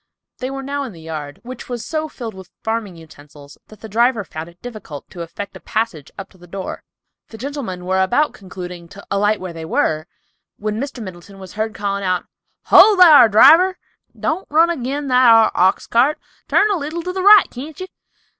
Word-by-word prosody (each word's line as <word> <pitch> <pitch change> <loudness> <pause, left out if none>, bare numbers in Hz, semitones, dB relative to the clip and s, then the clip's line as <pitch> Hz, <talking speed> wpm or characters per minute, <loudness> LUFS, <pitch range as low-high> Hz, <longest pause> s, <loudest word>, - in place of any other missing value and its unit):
They 255 - -4
were 270 0 -6
now 280 +1 -3
in 260 -6 -6
the 165 - -14
yard, 155 -3 -7
which 250 0 -9
was 240 -3 -5
so 310 -1 -3
filled 230 -6 -7
with 190 -1 -12
farming 220 -4 -3
utensils 145 -3 -15
that 215 - -17
the 220 - -8
driver 230 +1 +1
found 160 -1 -8
it 170 +1 -21
difficult 210 -12 -9
to 175 - -8
effect 195 +4 -7
a - - -9
passage 215 -10 -3
up 195 - -7
to 185 - -22
the 175 - -15
door. 190 +2 -6 0.5
The 225 - -12
gentlemen 240 -9 -6
were 190 +1 +1
about 245 +11 +1
concluding 180 -3 -9
to 200 +4 -14
alight 205 +1 +1
where 185 -2 -7
they 165 -1 -8
were, 155 0 -1 0.5
when 215 +2 -3
Mr. 270 -4 -6
Middleton 185 +1 -11
was 190 -1 -11
heard 220 0 -3
calling 200 -1 -3
out, 185 -1 -1 0.4
"Ho, 430 -1 +7
thar, 305 -10 +8
driver, 350 - +6 0.4
don't 330 +5 -2
run 325 +3 +4
agin 280 -1 -4
that 250 -1 +5
ar 225 -1 +6
ox 185 +1 +2
cart; 260 +6 +2 0.3
turn 420 +1 +3
a 395 - +1
leetle 320 +3 -5
to 365 +1 -4
the 380 - -3
right, 405 0 +8
can't 290 +4 -9
ye? 370 - -5
220 Hz, 200 wpm, -19 LUFS, 185-275 Hz, 0.5 s, thar